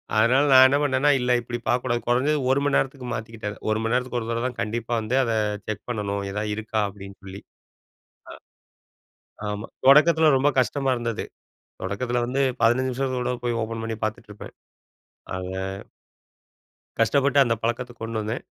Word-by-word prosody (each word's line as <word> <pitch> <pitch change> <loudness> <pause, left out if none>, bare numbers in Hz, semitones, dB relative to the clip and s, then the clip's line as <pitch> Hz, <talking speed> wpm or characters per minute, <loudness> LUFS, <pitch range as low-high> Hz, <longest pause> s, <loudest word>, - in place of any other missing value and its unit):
அதனால 120 +6 +4
நான் 130 0 +9
என்ன 140 +2 +2
பண்ணேனா, 140 0 +2
இல்ல 125 0 0
இப்படி 120 0 -5
பாக்கக்கூடாது. 120 -1 0
குறைஞ்சது 140 +5 +2
1 135 - +3
மணி 145 -1 +1
நேரத்துக்கு 135 -2 -2
மாத்திக்கிட்டது 110 -2 -5
1 110 0 +1
மணி 115 +1 0
நேரத்துக்கு 125 0 0
ஒரு 115 -1 -6
தடவதான் 120 +1 -2
கண்டிப்பா 115 +2 -3
வந்து, 110 +4 -2
அத 115 - -1 0.4
செக் 105 -1 -5
பண்ணணும் 100 -3 -3
எதாவது 105 +1 -2
இருக்கா 110 0 -3
அப்டின்னு 100 0 -11
சொல்லி. 95 0 -9 2.0
அ. - - -3
ஆமா. 105 +2 -6 0.2
தொடக்கத்தில 155 +2 +6
ரொம்ப 140 +3 +2
கஷ்டமா 135 +1 0
இருந்தது. 115 -2 -3 0.6
தொடக்கத்தில 120 +6 -2
வந்து 135 +2 0 0.2
15 120 +3 +3
நிமிஷத்துக்கு 130 0 -2
ஒருதட 125 0 -2
போய் 120 -1 0
ஓப்பன் 115 0 -5
பண்ணி 115 -1 -4
பாத்துட்டு 110 -1 -5
இருப்பேன். 105 - -11 0.8
அத. 95 - -5 1.6
கஷ்டப்பட்டு 140 +4 +3
அந்த 120 -3 0
பழக்கத்த 120 +2 -2
கொண்டு 115 0 -4
வந்தேன். 110 +4 -4
120 Hz, 155 wpm, -24 LUFS, 110-130 Hz, 2.0 s, நான்